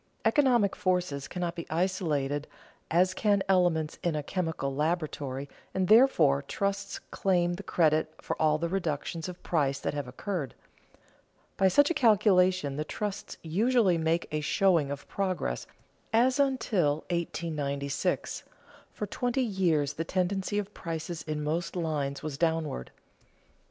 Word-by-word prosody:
Economic 245 -9 +3
forces 180 -7 -1
cannot 175 -2 -3
be 170 - -7
isolated 155 -5 -1 0.4
as 180 +3 +3
can 200 0 +2
elements 175 -5 +2
in 170 -3 0
a 150 - -2
chemical 160 -5 -2
laboratory, 150 -3 -2 0.3
and, 190 -1 +1
therefore, 175 - +5
trusts 200 +8 -2
claim 175 -2 +1
the 180 - -5
credit 155 -4 +2
for - - -3
all 155 -1 +4
the 170 +2 -1
reductions 165 -2 -2
of 180 - -10
price 140 -5 +1
that - - -2
have 145 -3 -3
occurred. 140 - -4 1.0
By 190 - +4
such 290 - +4
a - - +3
calculation 185 - +3
the 150 - -1
trusts 205 +5 -5
usually 195 +2 +2
make 160 +1 0
a 155 0 -1
showing 165 -1 +2
of 140 0 -6
progress, 185 - -2 0.4
as, 250 +5 +3
until 205 - +1
1896, 145 -5 -2 0.5
for 210 - -4
twenty 245 +5 -1
years 170 - +1
the 165 - -3
tendency 190 +3 -1
of 205 0 -3
prices 165 0 -5
in 150 -1 -4
most 165 +5 -2
lines 150 -5 -2
was 145 -3 -5
downward. 160 - -1
170 Hz, 135 wpm, -29 LUFS, 150-195 Hz, 1.0 s, therefore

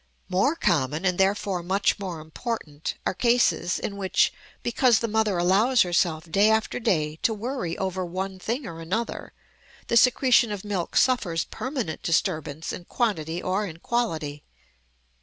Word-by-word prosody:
More 230 - +2
common, 155 - 0
and 180 -1 +1
therefore 195 -1 +1
much 190 +4 +1
more 180 -5 -5
important, 155 -2 -5
are - - +1
cases 235 -5 +2
in 200 - -4
which, 190 -2 +2 0.3
because 240 -1 +3
the 230 - -1
mother 215 -3 +1
allows 205 +9 +4
herself 170 -2 0
day 200 +5 +4
after 220 +2 +1
day 155 -8 0
to 220 +6 0
worry 220 -6 -3
over 190 -1 -2
one 185 +2 -4
thing 235 +8 -3
or 165 -1 -7
another, 205 +8 -3 0.6
the 235 - +4
secretion 250 -1 +5
of 205 -1 -5
milk 195 -5 -3
suffers 185 -10 +2
permanent 260 - -4
disturbance 160 -3 -1
in 175 - -8
quantity 175 -8 -1
or 195 +3 0
in 165 -3 -9
quality. 160 -10 -2
190 Hz, 150 wpm, -25 LUFS, 165-225 Hz, 0.6 s, secretion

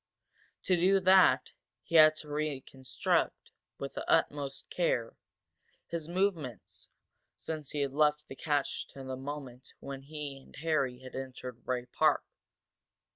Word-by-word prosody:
To 185 - +3
do 190 +3 +4
that 185 -8 +5 0.3
he - - -12
had 155 -1 +8
to 155 - -8
reconstruct, 145 -3 -1 0.3
with 140 - -5
the - - -5
utmost 145 -4 0
care, 120 -10 0 0.7
his 165 -2 -5
movements 170 - -2 0.5
since 155 -3 -5
he 145 - -2
had 140 -1 -1
left 150 0 +2
the - - -8
cache 145 -1 -1
to 135 - -8
the 130 0 -4
moment 135 -2 -8
when 135 -1 -7
he 145 -1 -7
and 135 - -17
Harry 140 -5 0
had 130 - -9
entered 125 -2 -7
Bray 125 -1 -2
Park. 125 - +2
145 Hz, 135 wpm, -31 LUFS, 130-155 Hz, 0.7 s, had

